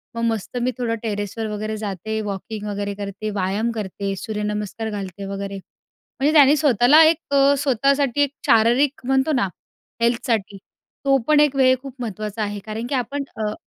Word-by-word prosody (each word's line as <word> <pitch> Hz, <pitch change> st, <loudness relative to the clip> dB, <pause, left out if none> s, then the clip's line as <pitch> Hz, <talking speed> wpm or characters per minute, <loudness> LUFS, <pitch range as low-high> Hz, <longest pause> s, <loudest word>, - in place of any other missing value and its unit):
मग 230 Hz, -, -3 dB
मस्त 225 Hz, +1 st, -2 dB
मी 255 Hz, +1 st, +1 dB
थोडं 230 Hz, -2 st, -1 dB
टेरेसवर 210 Hz, +1 st, -3 dB
वगैरे 215 Hz, +1 st, -3 dB
जाते, 215 Hz, +1 st, -4 dB
वॉकिंग 210 Hz, +1 st, -5 dB
वगैरे 205 Hz, 0 st, -3 dB
करते. 200 Hz, +1 st, -5 dB
व्यायाम 205 Hz, +3 st, -1 dB
करते, 200 Hz, -2 st, -4 dB
सूर्यनमस्कार 210 Hz, +1 st, -3 dB
घालते 195 Hz, -1 st, -6 dB
वगैरे. 200 Hz, 0 st, -5 dB
म्हणजे 280 Hz, +9 st, -5 dB
त्याने 290 Hz, -1 st, +7 dB
स्वतःला 285 Hz, +2 st, +5 dB
एक 320 Hz, -3 st, -3 dB, 0.2 s
स्वतःसाठी 275 Hz, 0 st, +1 dB
एक 285 Hz, -1 st, +2 dB
शारीरिक 245 Hz, +4 st, +3 dB
म्हणतो 265 Hz, +3 st, +2 dB
ना 195 Hz, -, +1 dB, 0.5 s
हेल्थसाठी, 230 Hz, -4 st, 0 dB, 0.5 s
तो 275 Hz, 0 st, +5 dB
पण 305 Hz, -1 st, +5 dB
एक 295 Hz, -2 st, +3 dB
वेळ 260 Hz, -1 st, +5 dB
खूप 270 Hz, -2 st, -9 dB
महत्त्वाचा 215 Hz, -1 st, -4 dB
आहे. 205 Hz, 0 st, -3 dB
कारण 220 Hz, +2 st, -4 dB
की 280 Hz, -, 0 dB
आपण 275 Hz, +3 st, -2 dB, 0.2 s
अ 210 Hz, -, -1 dB
220 Hz, 160 wpm, -22 LUFS, 205-265 Hz, 0.5 s, त्याने